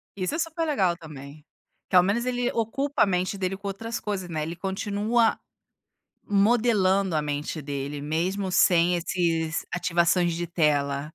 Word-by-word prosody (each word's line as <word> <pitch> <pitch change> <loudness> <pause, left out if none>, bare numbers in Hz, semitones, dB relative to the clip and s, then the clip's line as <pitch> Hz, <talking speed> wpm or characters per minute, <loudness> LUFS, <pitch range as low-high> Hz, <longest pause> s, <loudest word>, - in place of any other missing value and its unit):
Isso 185 - -2
é 325 - -3
super 330 0 -2
legal 190 - +1
também. 150 -2 -11 0.4
Que, 185 - -1
ao 180 - +8
menos, 215 +6 0
ele 245 -1 0
ocupa 270 +6 0
a - - +5
mente 185 +1 -1
dele, 190 0 -2
com 200 0 -7
outras 225 +4 -4
coisas, 190 -4 -4
né, 155 -2 -2
ele 165 +2 -5
continua 205 +5 0 0.9
modelando 200 -3 +2
a 155 - +1
mente 150 +2 -3
dele, 140 0 -5
mesmo 180 +6 -2
sem 175 -1 +4
esses, 165 -2 -1
ativações 175 0 +2
de 175 +1 -3
tela. 145 -4 +1
185 Hz, 155 wpm, -25 LUFS, 160-205 Hz, 0.9 s, ao